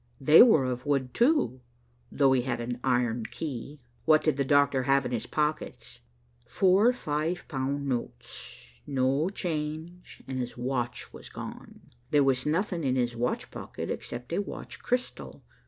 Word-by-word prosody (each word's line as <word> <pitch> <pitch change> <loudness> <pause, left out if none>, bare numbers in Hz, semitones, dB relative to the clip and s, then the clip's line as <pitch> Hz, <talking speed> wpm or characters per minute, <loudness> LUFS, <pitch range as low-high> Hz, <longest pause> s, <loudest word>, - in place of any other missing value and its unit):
They 155 +2 +8
were 220 - +6
of 125 +1 -3
wood, 135 -3 0
too, 245 - +2 0.5
though 140 -2 +3
he 130 -1 +3
had 120 -1 -2
an 120 +1 -4
iron 120 -3 +1
key." 145 -1 -6 0.3
"What 155 -1 +5
did 155 - +2
the 140 - +1
doctor 140 -1 +3
have 135 0 +3
in - - -3
his 120 -3 -2
pockets?" 155 0 -3 0.5
"Four 195 +5 +4
five 160 -5 -2
pound 140 +2 -2
notes, - - -6
no 135 +4 +1
change, 165 -1 -5
and 130 -1 -3
his 125 -1 -4
watch 120 -1 -3
was - - -10
gone. - - -9 0.3
There 145 -2 +4
was 135 0 +1
nothing 170 +1 0
in 130 -2 +1
his 120 -2 0
watch 120 +1 -2
pocket - - -6
except 125 +6 -6
a 190 - +1
watch 200 - -8
crystal. 250 +1 -3
140 Hz, 155 wpm, -28 LUFS, 125-155 Hz, 0.5 s, They